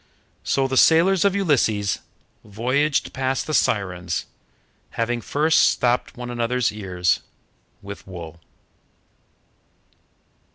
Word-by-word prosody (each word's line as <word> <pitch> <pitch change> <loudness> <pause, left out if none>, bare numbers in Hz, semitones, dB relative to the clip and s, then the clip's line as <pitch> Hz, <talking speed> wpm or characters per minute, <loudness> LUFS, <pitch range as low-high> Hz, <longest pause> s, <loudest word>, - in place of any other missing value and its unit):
So 135 -1 +1
the 130 0 -2
sailors 170 +5 +5
of 200 -1 +3
Ulysses 115 - +1 0.4
voyaged 130 +8 0
past 130 0 -1
the 155 - -4
Sirens, 90 - 0 0.7
having 120 +1 -1
first 155 +7 +2
stopped 125 0 +1
one 120 0 -6
another's 120 +1 0
ears 90 -4 -1 0.6
with 100 0 -9
wool. 85 -3 -9
120 Hz, 95 wpm, -22 LUFS, 100-140 Hz, 0.7 s, sailors